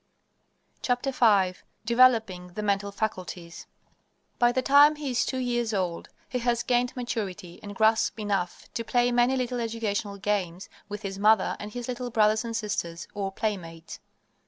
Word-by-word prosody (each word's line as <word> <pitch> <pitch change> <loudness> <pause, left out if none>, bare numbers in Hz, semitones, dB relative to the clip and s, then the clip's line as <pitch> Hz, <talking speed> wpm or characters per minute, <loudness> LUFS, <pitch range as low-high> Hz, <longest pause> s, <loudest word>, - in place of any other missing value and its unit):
V 245 -1 +2 0.9
DEVELOPING 225 -7 +3
THE 210 - -3
MENTAL 200 0 0
FACULTIES 185 -5 -5 0.7
By 240 0 +5
the 260 +1 -1
time 285 +3 +6
he 295 -3 -4
is 240 - +2
two 260 - -3
years 240 -3 -1
old 180 -3 -2 0.2
he 250 - -3
has 240 0 0
gained 245 0 +1
maturity 200 -8 -5
and 205 -1 -8
grasp 220 +1 +2
enough 200 -4 -2
to 230 - -3
play 245 +1 +2
many 245 +2 +3
little 250 -1 -2
educational 220 -3 -2
games 195 -3 -2 0.2
with 205 0 -6
his 195 -1 -5
mother 215 -1 +4
and 210 0 -7
his 245 -1 -5
little 250 0 -4
brothers 215 -1 +3
and 230 -1 -4
sisters, 175 -6 -3
or 195 -2 -3
playmates. 170 -6 -5
220 Hz, 155 wpm, -27 LUFS, 195-245 Hz, 0.9 s, time